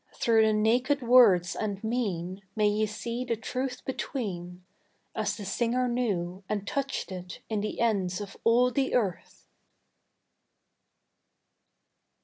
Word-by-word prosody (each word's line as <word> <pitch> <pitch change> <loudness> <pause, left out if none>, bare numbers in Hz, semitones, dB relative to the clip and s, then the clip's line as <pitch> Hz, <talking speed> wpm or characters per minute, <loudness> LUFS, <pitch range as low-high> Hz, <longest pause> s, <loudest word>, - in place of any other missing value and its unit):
Through 225 -1 +3
the - - +3
naked 245 +6 +2
words 230 -8 +6
and 205 -2 -3
mean 195 -6 -2
May 210 -1 +3
ye 210 +1 +1
see 235 +3 -4
the 240 -2 -1
truth 255 +3 -4
between 180 -10 -4 0.5
As - - -1
the 205 - -7
singer 240 +5 0
knew 195 -7 -2
and 205 -2 -2
touched 275 -6 -2
it 180 0 -7
in 215 -2 -1
the 215 - -4
ends 195 -6 +1
of 200 -1 -7
all 245 +2 +4
the 270 0 0
Earth! 200 -8 -2
220 Hz, 130 wpm, -28 LUFS, 195-245 Hz, 0.5 s, words